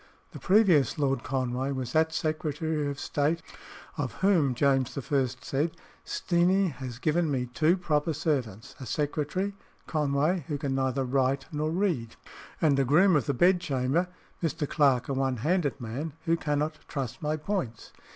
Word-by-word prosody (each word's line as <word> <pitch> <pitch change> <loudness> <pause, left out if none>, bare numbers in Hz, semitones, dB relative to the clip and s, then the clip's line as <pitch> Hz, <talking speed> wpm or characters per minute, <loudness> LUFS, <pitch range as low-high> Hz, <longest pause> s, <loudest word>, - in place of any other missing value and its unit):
The - - -9
previous 185 -8 +4
Lord 135 -4 +1
Conway 130 0 -1
was 130 -3 -4
that 160 0 +3
Secretary 155 -1 -1
of 140 0 -5
State 155 +3 0 0.6
of 130 -5 -2
whom 160 -10 +3
James 135 -1 +1
I. 135 0 +1 0.2
said, 150 +4 -1 0.3
"Steenie 185 +2 +2
has 130 -3 -7
given 160 +4 +1
me 130 -3 0
two 155 +8 +2
proper 160 -3 0
servants 130 - -2
a 130 - -7
secretary 150 - -1 0.3
(Conway) 150 +2 0
who 150 - -2
can 140 -1 -2
neither 130 0 0
write 135 +1 +1
nor 155 0 -1
read, 165 - -1 0.4
and 145 -4 +3
a - - +4
groom 170 +8 +5
of 140 -7 +1
the - - 0
bedchamber 170 -2 +2 0.3
(Mr. 155 -3 -1
Clarke, 135 -6 +2
a 140 - -1
one 135 -1 0
handed 150 +2 0
man) 135 +6 -5
who 165 - +3
cannot 150 -1 -1
truss 135 -5 -4
my 155 0 -1
points." 155 - -4
145 Hz, 155 wpm, -28 LUFS, 135-165 Hz, 0.6 s, groom